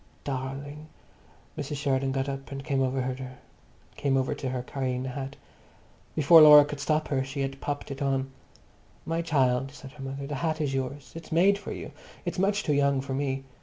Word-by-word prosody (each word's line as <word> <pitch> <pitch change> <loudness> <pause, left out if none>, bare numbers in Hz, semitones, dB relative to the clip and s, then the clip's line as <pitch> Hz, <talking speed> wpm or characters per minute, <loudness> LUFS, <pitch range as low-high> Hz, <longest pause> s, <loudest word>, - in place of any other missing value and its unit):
"Darling!" 140 +3 -5 0.7
Mrs. 145 0 -4
Sheridan 135 -1 0
got 135 0 -1
up 135 0 -5
and 135 0 -5
came 135 -2 +1
over 130 0 0 1.2
to 135 - -4
her, 125 -1 -3
carrying 130 -1 -2
the 130 - -3
hat. 135 +1 -5 0.8
Before 160 +2 +8
Laura 150 -1 +10
could 145 0 -6
stop 155 +2 0
her 135 -2 +1
she 135 +1 -4
had 135 0 -3
popped 145 0 -4
it 135 - -6
on. 135 -1 0 0.7
"My 165 +1 -1
child!" 135 -5 +1
said 140 -2 -11
her 140 -1 -10
mother, 135 +1 -5
"the 145 - -5
hat 160 -1 0
is 145 -3 -1
yours. 135 +1 -4
It's 165 0 -10
made 195 +5 +4
for - - -7
you. - - -6 0.3
It's - - -3
much 200 +2 +2
too 150 - +1
young 140 -1 +3
for 135 0 -4
me. 135 -1 -1
140 Hz, 185 wpm, -27 LUFS, 135-150 Hz, 1.2 s, Laura